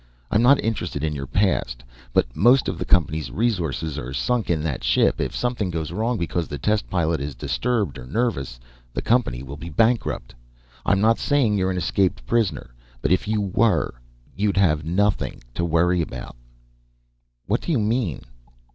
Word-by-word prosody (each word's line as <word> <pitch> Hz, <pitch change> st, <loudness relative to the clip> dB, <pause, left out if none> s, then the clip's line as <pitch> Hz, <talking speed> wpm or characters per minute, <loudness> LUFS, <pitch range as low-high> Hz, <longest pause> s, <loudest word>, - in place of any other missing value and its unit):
I'm 105 Hz, -, +3 dB
not 135 Hz, +4 st, +6 dB
interested 90 Hz, -9 st, -2 dB
in 75 Hz, -1 st, 0 dB
your 70 Hz, -2 st, -5 dB
past, 60 Hz, -12 st, 0 dB, 0.3 s
but -, -, +1 dB
most 120 Hz, +9 st, +5 dB
of -, -, -3 dB
the -, -, -2 dB
company's 80 Hz, -3 st, +1 dB
resources 85 Hz, -, -1 dB
are 65 Hz, 0 st, -6 dB
sunk 110 Hz, -, 0 dB
in 80 Hz, -3 st, +1 dB
that 70 Hz, -6 st, -3 dB
ship. -, -, +2 dB
If -, -, -2 dB
something 120 Hz, -6 st, -1 dB
goes 80 Hz, -3 st, -3 dB
wrong 115 Hz, +2 st, -1 dB
because 85 Hz, -1 st, -2 dB
the 75 Hz, -, -5 dB
test 105 Hz, +9 st, 0 dB
pilot 80 Hz, -4 st, 0 dB
is 70 Hz, -1 st, -4 dB
disturbed 105 Hz, -, -1 dB
or 60 Hz, -, -10 dB
nervous, 70 Hz, -, -1 dB, 0.4 s
the -, -, -2 dB
company 110 Hz, -, +1 dB
will 70 Hz, +2 st, -8 dB
be 85 Hz, +3 st, -7 dB
bankrupt. 110 Hz, -, +1 dB, 0.5 s
I'm 100 Hz, -, +3 dB
not 115 Hz, +2 st, +4 dB
saying 135 Hz, -8 st, +2 dB
you're 95 Hz, -2 st, +1 dB
an 90 Hz, -, -1 dB
escaped 95 Hz, +1 st, 0 dB
prisoner, 95 Hz, -, 0 dB, 0.3 s
but -, -, +1 dB
if 95 Hz, +3 st, +2 dB
you 110 Hz, -1 st, +1 dB
were, 100 Hz, +3 st, +1 dB, 0.4 s
you'd 100 Hz, 0 st, 0 dB
have 80 Hz, -6 st, +3 dB
nothing 100 Hz, +6 st, 0 dB
to 85 Hz, -, -2 dB
worry 85 Hz, +1 st, +2 dB
about." 60 Hz, -7 st, -6 dB, 1.1 s
"What 105 Hz, +5 st, 0 dB
do -, -, -3 dB
you 150 Hz, -, +3 dB
mean?" 110 Hz, -, -1 dB
90 Hz, 175 wpm, -23 LUFS, 75-110 Hz, 1.1 s, not